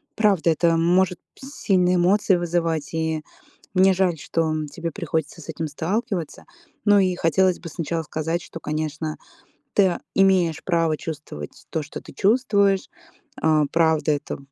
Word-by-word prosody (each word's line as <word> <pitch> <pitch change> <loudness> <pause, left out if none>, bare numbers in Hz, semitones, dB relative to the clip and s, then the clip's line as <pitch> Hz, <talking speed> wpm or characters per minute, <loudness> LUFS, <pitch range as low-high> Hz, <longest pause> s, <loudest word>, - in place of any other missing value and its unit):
Правда, 195 -6 +3
это 165 +1 +2
может 180 +2 +2 0.2
сильные 190 -10 0
эмоции 190 +3 +3
вызывать, 165 -3 -1
и 160 -1 -1 0.5
мне 190 0 +5
жаль, 180 -3 +1
что, 165 +2 -2
м, 155 -1 -2
тебе 165 +3 -5
приходится 160 -3 -3
с 160 - -13
этим 160 0 -3
сталкиваться. 180 - -3 0.4
Ну 205 -1 +6
и 185 -2 +2
хотелось 185 +2 +2
бы 170 - -8
сначала 165 0 -3
сказать, 160 +3 -2
что, 165 - -9
конечно, 155 0 -3 0.6
ты, 205 - +5
э, 180 -2 +1 0.2
имеешь 185 -5 +3
право 165 -3 +1
чувствовать 150 - -8
то, 160 - -2
что 145 - -8
ты - - -12
чувствуешь. 200 -3 +2 0.5
Э, 155 -1 +4
правда, 160 -2 +2
это 145 0 -3
170 Hz, 150 wpm, -23 LUFS, 160-190 Hz, 0.6 s, Ну